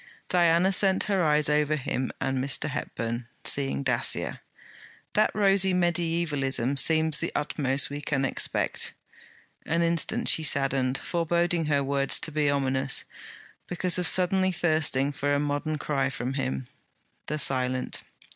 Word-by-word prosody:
Diana 175 +1 +3
sent 190 0 +4
her 195 -4 +1
eyes 150 -1 +3
over 150 +1 +1
him 130 -2 -3
and 135 -1 -1
Mr. 140 +3 -1
Hepburn, 120 -2 -4 0.2
seeing 140 0 +2
Dacier. 125 -3 0 0.7
'That 215 - +3
rosy 195 -2 +3
mediaevalism 165 -7 0
seems 160 +1 +2
the - - -2
utmost 140 -2 +1
we 145 0 -5
can 140 -2 -1
expect.' - - -1 0.7
An 165 +1 0
instant 170 -1 +1
she - - +3
saddened, 135 -2 +1
foreboding 170 0 0
her 145 -2 +1
words 140 0 +1
to 160 - -3
be 150 -1 +1
ominous, 135 -1 0 0.6
because 180 0 0
of 180 - 0
suddenly 185 +1 +3
thirsting 155 -5 +1
for 145 0 -1
a - - +1
modern 145 +2 -2
cry 140 -2 -1
from 130 -2 -4
him, 130 -1 -3 0.6
the 150 - -2
silent. 130 -3 0
150 Hz, 135 wpm, -26 LUFS, 135-170 Hz, 0.7 s, sent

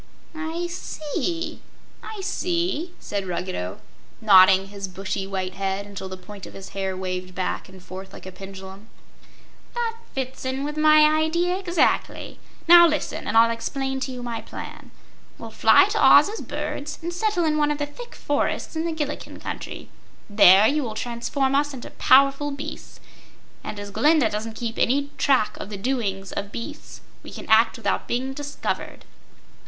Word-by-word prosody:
"I 320 +2 -4
see; 335 0 -4 0.4
I 435 -2 -7
see," 350 -3 -1
said 200 -2 -4
Ruggedo, 175 - -4 0.4
nodding 195 -2 +6
his 200 -1 -6
bushy, 190 +1 -4
white 190 -1 -3
head 195 +1 -2
until 200 -2 -7
the 185 - -7
point 200 +1 -10
of - - -13
his 195 -1 -9
hair 190 -1 -3
waved 185 -1 -5
back 185 0 -3
and 190 -1 -14
forth 190 +1 -9
like - - -12
a 190 - -7
pendulum. 190 +2 -10 0.9
"That 465 -1 -2 0.2
fits 265 -1 -4
in 260 +1 -2
with 295 +1 -4
my 305 0 +6
idea, 320 +4 +2
exactly. 360 -3 0 0.3
Now, 345 0 +9
listen, 305 -2 -3
and 225 - +1
I'll 230 0 +6
explain 265 +3 -3
to 265 - -3
you 250 -1 -7
my 235 -2 -4
plan. - - -9 0.5
We'll - - -9
fly - - +6
to - - 0
Oz - - +8
as 440 - -6
birds 290 +1 -5
and 345 +1 -3
settle 365 -2 0
in 305 -1 +1
one 295 -1 +2
of 295 - 0
the 290 - -1
thick 480 +12 -11
forests 290 +2 -2
in 320 +1 -1
the 335 - -1
Gillikin 295 -2 -5
Country. - - -7 0.4
There 205 -1 +7
you 300 +2 +1
will 225 -5 -4
transform 245 +4 -1
us 290 0 +1
into 245 - -9
powerful 275 +2 +4
beasts, 285 +1 -8 0.6
and 205 - -6
as 205 0 -7
Glinda 300 +5 +3
doesn't 220 +1 -4
keep 230 -1 -4
any 280 +3 +1
track 260 -6 +2
of - - -7
the 205 - -5
doings 195 -4 -2
of 200 0 -4
beasts 300 +6 -8 0.2
we - - -11
can - - -9
act 225 +1 +5
without 230 - -1
being 260 +2 -2
discovered." 290 +1 -5
255 Hz, 170 wpm, -24 LUFS, 195-305 Hz, 0.9 s, Now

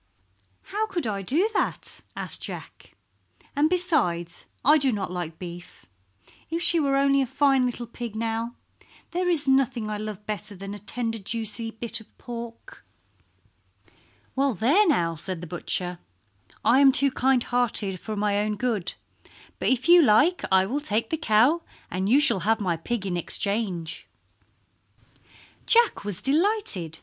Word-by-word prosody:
"How 435 +1 0
could 350 - -3
I 200 -3 -2
do 305 - +1
that?" - - -1
asked - - -3
Jack. - - -8 0.6
"And 295 +2 +3
besides 235 - 0 0.2
I 300 +3 +6
do 270 -2 +3
not 200 -5 -3
like 175 -3 -5
beef. 175 -1 -10 0.6
If 335 +2 -2
she 340 - +3
were 275 -2 +2
only 275 0 +3
a 265 - 0
fine 270 -1 +3
little 245 0 -4
pig, 235 -1 -7
now! 230 +1 -2 0.6
There 360 +1 0
is 305 -5 +4
nothing 260 -5 +2
I 210 - -2
love 210 -1 -6
better 210 -1 -4
than 195 +2 -7
a 205 - -7
tender 225 +2 -3
juicy 225 +2 -3
bit 230 0 -4
of 220 - -21
pork." 235 -1 -9 1.5
"Well, 275 -2 +1
there 290 - +4
now!" 170 - +2
said 170 +2 -5
the 175 - -7
butcher. 175 +1 -3 0.7
"I 260 - +5
am 275 -1 +7
too 275 +1 +4
kind 260 -1 +2
hearted 220 -6 -1
for 215 +4 -5
my 205 0 +1
own 210 0 -1
good, 215 -6 -2 0.6
but - - -1
if 260 0 +1
you 350 0 +8
like 300 +8 +4
I 190 0 +5
will 270 +9 -2
take 225 -5 -1
the - - +2
cow 295 +2 +3 0.3
and 190 +2 -1
you 265 +5 +6
shall 295 -10 +3
have 220 +5 +1
my 180 -5 0
pig 200 +6 -4
in 180 -2 -1
exchange." 190 -2 -2 1.6
Jack 470 - +4
was 205 -3 -4
delighted. 285 - +1
230 Hz, 160 wpm, -25 LUFS, 200-275 Hz, 1.6 s, you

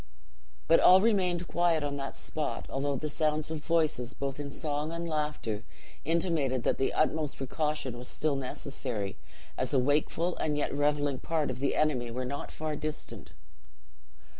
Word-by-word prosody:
But 165 - +7
all 185 +1 +8
remained 185 -5 +2
quiet 170 -3 +2
on 145 -1 -1
that 135 0 -5
spot, 155 -2 -3
although 140 +1 0
the 155 +4 -2
sounds 155 0 0
of 155 -2 -4
voices, 155 -7 +1
both 140 0 -3
in 145 -1 -4
song 150 +1 -2
and 170 0 -3
laughter, 150 -9 -2 0.4
intimated 160 -6 +1
that - - +1
the 135 - +2
utmost 155 -1 +1
precaution 150 -1 -2
was 125 - -7
still 155 -2 0
necessary, 125 -6 -4 0.4
as 130 +2 0
a - - +6
wakeful 150 +6 +1
and 150 -1 0
yet 150 - 0
reveling 145 -1 +1
part 160 -4 0
of 130 - -6
the 140 0 +1
enemy 130 -6 +1
were 125 +2 -3
not 140 +3 -4
far 155 -1 -3
distant. 155 0 -5
150 Hz, 165 wpm, -30 LUFS, 135-155 Hz, 0.4 s, all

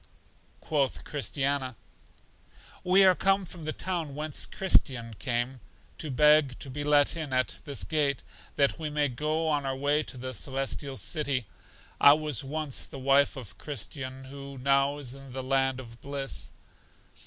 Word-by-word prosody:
Quoth 140 -4 0
Christiana: 140 -2 -1 1.1
We 185 +2 +5
are 190 -1 +7
come 195 +1 +2
from 165 -2 -7
the 155 - -1
town 165 -5 -3
whence 150 0 -1
Christian 130 -11 +2
came, 125 0 -1 0.4
to 155 - -4
beg 150 0 +4
to 135 - -4
be 145 +3 -4
let 145 0 +4
in 155 -4 -4
at 130 0 0
this 140 -2 -2
gate, 145 -4 0 0.3
that 140 +3 +2
we 155 -2 -3
may 150 -1 +1
go 155 +5 -1
on 145 -2 +1
our 135 -1 -2
way 145 +3 +1
to 140 - -7
The 130 +1 -5
Celestial 135 +3 -2
City. 140 -5 0 0.5
I 140 - +9
was 150 -3 0
once 150 0 -1
the - - -9
wife 135 +2 +3
of 105 -7 -10
Christian, 135 -1 -4
who 140 +1 -9
now 140 +2 +2
is 130 -4 -5
in 135 -2 -11
the 130 0 -4
land 135 0 +1
of 115 -2 -11
bliss. 140 -1 -2
140 Hz, 160 wpm, -28 LUFS, 130-150 Hz, 1.1 s, I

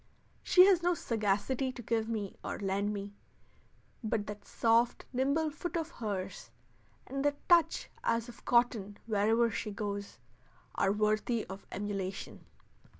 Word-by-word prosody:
She 365 0 +7
has 380 -3 +5
no 350 0 +2
sagacity 230 +3 0
to 240 - -8
give 225 0 0
me 210 -4 -3
or - - -3
lend 200 +1 0
me, 200 -1 -5 0.9
but 215 -1 -1
that 205 0 -8
soft, 230 +1 +2
nimble 280 +5 +1
foot 350 +3 -4
of 330 0 -3
hers, 200 - -4 0.6
and 275 +1 -3
that 290 0 -1
touch 345 -2 +4 0.2
as 230 0 +1
of 240 - -12
cotton 235 -4 +2
wherever 225 +2 +3
she 215 - -3
goes, 200 -1 -4 0.6
are 195 - +2
worthy 215 +2 +1
of 195 +1 -9
emulation. 195 -1 -4
225 Hz, 140 wpm, -32 LUFS, 205-255 Hz, 0.9 s, She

